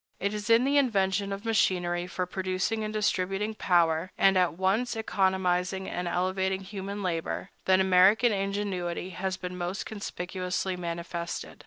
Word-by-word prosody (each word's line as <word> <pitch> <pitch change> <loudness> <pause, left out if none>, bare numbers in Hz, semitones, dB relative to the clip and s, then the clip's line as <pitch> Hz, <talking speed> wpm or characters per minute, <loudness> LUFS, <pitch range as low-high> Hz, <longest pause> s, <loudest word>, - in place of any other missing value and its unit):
It 200 +2 -1
is 210 +1 -4
in 230 +1 +6
the 285 +2 +4
invention 200 -5 +1
of 195 +3 -5
machinery 180 -5 +1
for 180 0 -2
producing 190 +4 -2
and 215 - -3
distributing 210 0 0
power, 170 -3 +2
and 195 0 +5
at 180 -4 +3
once 200 +7 +1
economizing 190 -3 0
and 180 0 -3
elevating 190 +2 0
human 200 +1 -6
labor, 170 +1 -3
that 190 0 +4
American 190 +5 +5
ingenuity 195 -3 -2
has 185 +1 -3
been 180 0 -6
most 180 +2 -3
conspicuously 185 -2 -3
manifested. 170 0 -5
190 Hz, 145 wpm, -28 LUFS, 180-200 Hz, -, in